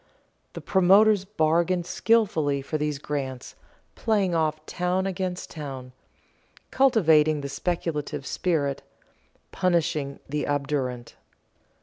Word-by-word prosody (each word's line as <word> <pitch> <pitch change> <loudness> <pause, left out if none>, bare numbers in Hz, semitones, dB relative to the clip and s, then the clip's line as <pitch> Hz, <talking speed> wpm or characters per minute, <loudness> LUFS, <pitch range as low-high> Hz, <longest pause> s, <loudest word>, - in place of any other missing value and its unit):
The - - -7
promoters 195 +2 +4
bargained 170 -1 +1
skilfully 165 -10 +1
for 155 +3 -3
these 150 -1 -1
grants, 135 -3 -5 0.4
playing 205 -5 0
off 155 -1 -1
town 180 +2 -1
against 185 -1 -4
town, 135 -5 -7 0.8
cultivating 160 - +4
the 140 - -5
speculative 150 -2 -3
spirit, 145 -6 -1 0.7
punishing 155 -6 0
the 150 +1 -2
obdurate. 140 -4 -2
155 Hz, 95 wpm, -25 LUFS, 145-185 Hz, 0.8 s, promoters